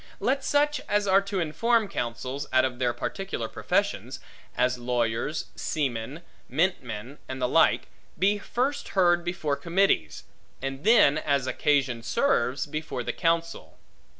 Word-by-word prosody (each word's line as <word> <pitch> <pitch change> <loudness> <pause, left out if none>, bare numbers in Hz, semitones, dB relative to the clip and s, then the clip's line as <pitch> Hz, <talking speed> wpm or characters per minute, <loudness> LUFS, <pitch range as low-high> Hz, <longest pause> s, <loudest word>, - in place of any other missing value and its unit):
Let 270 +1 0
such 295 +1 +2
as 205 0 +2
are 195 +1 +5
to 200 -1 -3
inform 220 +7 +1
counsels, 130 +1 -4
out 130 0 +4
of 125 -1 -4
their 125 -2 +2
particular 120 - -4
professions - - -1 0.4
(as 125 0 +1
lawyers, 120 +4 -1
seamen, 135 +1 -3 0.3
mintmen, 135 - -2
and 130 0 -5
the 125 - +1
like) - - +3 0.3
be 200 +4 +2
first 260 +7 -2
heard 175 -2 +4
before 170 -5 -1
committees; 170 - +1 0.4
and 135 +1 -5
then, 200 -9 +5
as 140 -4 0
occasion 130 -3 +1
serves, 135 - +1
before 155 -4 -4
the - - -3
counsel. 165 - -1
150 Hz, 135 wpm, -27 LUFS, 125-190 Hz, 0.4 s, are